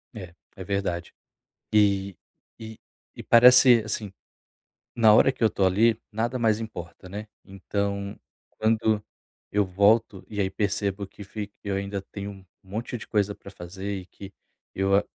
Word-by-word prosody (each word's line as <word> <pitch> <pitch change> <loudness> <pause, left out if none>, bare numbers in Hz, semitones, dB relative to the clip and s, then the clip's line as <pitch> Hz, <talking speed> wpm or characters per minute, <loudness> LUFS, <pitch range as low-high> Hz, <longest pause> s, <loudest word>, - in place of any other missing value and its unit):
É, 90 -5 -9 0.2
é 95 - -7
verdade. 90 -3 -3 0.6
E 100 -2 +2 0.4
e 110 -1 -9 0.4
e, - - -8
parece 125 0 +7
assim, 105 -2 -4 0.8
na 110 -2 +6
hora 135 - +6
que - - -11
eu 110 - +6
estou 95 -2 +1
ali, 110 +4 +3
nada 120 +4 -1
mais 110 -1 +2
importa, 90 -4 -8
né. 105 +3 -7 0.2
Então, 100 +1 -4 0.4
quando 110 -1 +1 0.5
eu 105 0 +3
volto 100 +1 +2
e 105 -1 -4
aí 95 -1 0
percebo 100 -1 -2
que 100 - -12
fi 105 0 -7
eu 100 -1 -2
ainda 100 0 -3
tenho 100 +1 -7
um 95 -1 -13 0.2
monte 110 +6 -5
de 110 - -10
coisa 105 -1 0
para 100 - -13
fazer 95 +2 -6
e 90 - -10
que 100 0 -12 0.4
eu 95 +1 +2
a 100 - +2
100 Hz, 160 wpm, -26 LUFS, 95-110 Hz, 0.8 s, parece